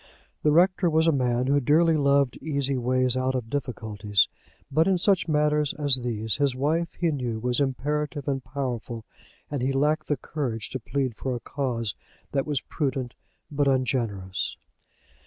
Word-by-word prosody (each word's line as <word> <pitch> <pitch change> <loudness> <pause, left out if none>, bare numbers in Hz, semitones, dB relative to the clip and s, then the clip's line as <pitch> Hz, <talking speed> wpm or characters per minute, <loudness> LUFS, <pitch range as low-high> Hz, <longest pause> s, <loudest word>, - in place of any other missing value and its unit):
The 150 - +3
rector 180 +2 +4
was 160 0 +3
a 165 - +5
man 125 -3 +1
who 140 +2 +3
dearly 160 +5 +4
loved 140 -3 +3
easy 140 -2 -1
ways 130 0 +1
out 130 0 0
of 115 -3 -4
difficulties. 105 -7 0 0.4
But 160 +5 +3
in 190 -1 +3
such 190 +1 +2
matters 150 -1 +2
as 145 -3 +3
these 110 -2 -2
his 140 -3 +1
wife 160 +6 0
he 170 -2 0
knew 125 -6 -2
was 125 +3 0
imperative 145 +2 -1
and 135 -2 -1
powerful, 125 -4 -4 0.5
and 145 -3 -2
he 130 +2 +1
lacked 150 +3 +1
the 145 - +1
courage 125 -6 -4
to 130 - -3
plead 125 +1 -2
for 130 +1 -3
a - - -4
cause 120 -6 -2 0.4
that 135 0 0
was 145 -3 0
prudent, 130 -5 -2 0.4
but 145 -1 +1
ungenerous. 115 -8 -1
135 Hz, 165 wpm, -26 LUFS, 125-150 Hz, 0.5 s, a